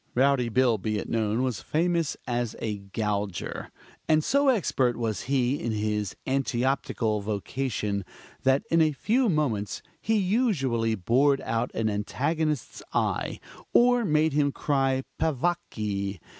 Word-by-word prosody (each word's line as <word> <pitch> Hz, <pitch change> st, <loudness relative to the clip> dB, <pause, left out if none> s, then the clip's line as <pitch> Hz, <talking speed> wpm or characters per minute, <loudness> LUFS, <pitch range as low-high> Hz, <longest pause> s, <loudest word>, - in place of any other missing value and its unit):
Rowdy 130 Hz, -1 st, +3 dB
Bill, 120 Hz, -1 st, +3 dB
be 110 Hz, +2 st, -1 dB
it -, -, -4 dB
known, 110 Hz, +2 st, 0 dB
was 125 Hz, -6 st, -2 dB
famous 170 Hz, -1 st, 0 dB
as 120 Hz, -2 st, -2 dB
a 105 Hz, -2 st, -3 dB
gouger, 100 Hz, -1 st, -3 dB, 0.4 s
and 155 Hz, -1 st, +4 dB
so 280 Hz, -, +2 dB
expert 135 Hz, -, +1 dB
was 115 Hz, +1 st, -3 dB
he 135 Hz, 0 st, +2 dB
in 115 Hz, -, -1 dB
his 105 Hz, -2 st, -1 dB
antioptical 130 Hz, -4 st, 0 dB
vocation, 105 Hz, 0 st, -2 dB, 0.4 s
that 135 Hz, +1 st, +3 dB
in 165 Hz, 0 st, +5 dB
a 155 Hz, -1 st, +3 dB
few 235 Hz, -, +1 dB
moments 120 Hz, -, -1 dB, 0.2 s
he 225 Hz, -, +1 dB
usually 170 Hz, -, +1 dB
bored 130 Hz, +8 st, +3 dB
out 115 Hz, +2 st, -1 dB
an 115 Hz, -, 0 dB
antagonist's 145 Hz, +7 st, -1 dB
eyes, -, -, 0 dB, 0.4 s
or 245 Hz, 0 st, +5 dB
made 155 Hz, -4 st, +2 dB
him 145 Hz, -1 st, +2 dB
cry 135 Hz, -2 st, 0 dB, 0.2 s
peccavi. 105 Hz, -, -1 dB
130 Hz, 130 wpm, -27 LUFS, 110-150 Hz, 0.4 s, in